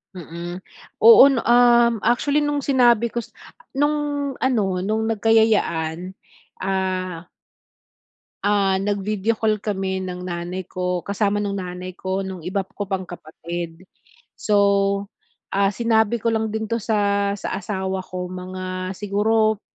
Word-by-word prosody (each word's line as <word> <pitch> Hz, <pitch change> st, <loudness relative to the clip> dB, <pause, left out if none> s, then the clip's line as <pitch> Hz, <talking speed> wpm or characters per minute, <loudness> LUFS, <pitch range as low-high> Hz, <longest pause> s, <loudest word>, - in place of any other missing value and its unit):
Mm. 175 Hz, +2 st, -7 dB, 0.4 s
Oo, 450 Hz, -, +10 dB
'no, 265 Hz, -4 st, +1 dB
um, 240 Hz, -1 st, +5 dB
actually 280 Hz, +7 st, +2 dB
nung 290 Hz, -1 st, -1 dB
sinabi 240 Hz, -4 st, +3 dB
ko 240 Hz, -, -2 dB
s 235 Hz, -, -10 dB, 0.4 s
nung 290 Hz, -1 st, 0 dB
ano, 210 Hz, -8 st, +1 dB
nung 215 Hz, +4 st, -1 dB
nagkayayaan, 190 Hz, -6 st, +1 dB, 0.5 s
ah 185 Hz, -2 st, -2 dB, 1.2 s
ah, 200 Hz, -2 st, +2 dB
nag-video 205 Hz, +2 st, -1 dB
call 215 Hz, -2 st, 0 dB
kami 190 Hz, -2 st, -2 dB
ng 180 Hz, 0 st, -6 dB
nanay 175 Hz, +1 st, -4 dB
ko. 180 Hz, -1 st, -3 dB
Kasama 205 Hz, 0 st, 0 dB
nung 200 Hz, -1 st, -2 dB
nanay 180 Hz, 0 st, -7 dB
ko 190 Hz, +1 st, -3 dB
nung 185 Hz, -3 st, -7 dB
iba 190 Hz, +2 st, -2 dB
ko 205 Hz, -, -3 dB
pang 190 Hz, -1 st, -2 dB
kapatid. 170 Hz, +1 st, -7 dB, 0.5 s
So, 210 Hz, -, 0 dB, 1.0 s
ah, 200 Hz, 0 st, +2 dB
sinabi 225 Hz, +1 st, +1 dB
ko 230 Hz, +1 st, 0 dB
lang 220 Hz, -1 st, -1 dB
din 220 Hz, 0 st, -3 dB
'to 230 Hz, 0 st, -2 dB
sa 200 Hz, -2 st, +1 dB
sa -, -, -3 dB
asawa 190 Hz, -2 st, -3 dB
ko, 180 Hz, -1 st, -5 dB
mga 185 Hz, 0 st, -5 dB
siguro 215 Hz, +1 st, +1 dB
200 Hz, 130 wpm, -22 LUFS, 185-225 Hz, 1.2 s, Oo